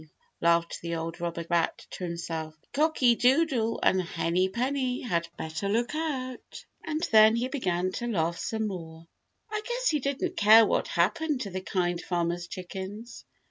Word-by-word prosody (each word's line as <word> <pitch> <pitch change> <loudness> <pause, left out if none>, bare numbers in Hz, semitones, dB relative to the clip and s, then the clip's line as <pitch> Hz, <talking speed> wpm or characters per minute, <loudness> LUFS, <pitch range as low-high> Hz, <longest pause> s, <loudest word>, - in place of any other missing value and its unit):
laughed 170 0 +2
the 170 0 -3
old 165 +1 -5
robber 170 -1 -3
rat 170 -1 +1
to - - -7
himself, 165 -2 -4 0.2
"Cocky 290 -5 +3
Doodle 250 -3 +2
and 190 - +4
Henny 175 +2 0
Penny 255 +3 -1
had 170 -8 -1
better 160 +5 -3
look 235 +6 0
out." 270 -6 -4 0.2
And 315 +1 -2
then 220 0 +7
he 240 +2 0
began 185 -9 -1
to 240 +5 -4
laugh 170 -6 0
some 220 -1 -2
more. 165 -4 -7 0.5
I 430 -1 -2
guess - - 0
he 300 - +1
didn't 275 0 -2
care 220 +2 +8
what - - 0
happened 320 -5 0
to 200 - -4
the 185 +1 -4
Kind 175 -2 -1
Farmer's 175 0 -2
chickens. 190 +6 -7
200 Hz, 160 wpm, -28 LUFS, 170-255 Hz, 0.5 s, care